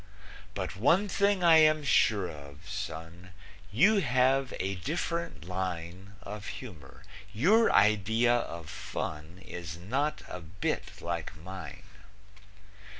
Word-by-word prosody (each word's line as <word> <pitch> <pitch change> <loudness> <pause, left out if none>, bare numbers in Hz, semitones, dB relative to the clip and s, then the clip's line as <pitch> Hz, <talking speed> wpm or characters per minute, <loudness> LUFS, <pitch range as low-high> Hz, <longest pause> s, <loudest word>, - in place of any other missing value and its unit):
But - - -4
one 165 - +3
thing 200 -1 +1
I 165 -2 +8
am 155 -1 +5
sure 105 -8 +3
of, 70 +1 -11
son, 90 -2 -7 0.4
You 195 - +5
have 130 -4 +2
a 95 +1 -1
different 165 - -3
line 90 +1 -5
Of 105 +1 -7
humor, 80 - -11 0.3
your 200 - +4
idea 110 +3 +4
of 85 -8 -5
fun 80 +4 -6
Is 85 -1 -7
not 135 - -2
a 90 - -6
bit 85 +3 -4
like 85 -2 -4
mine. 95 +4 -9
100 Hz, 115 wpm, -30 LUFS, 85-135 Hz, 0.4 s, I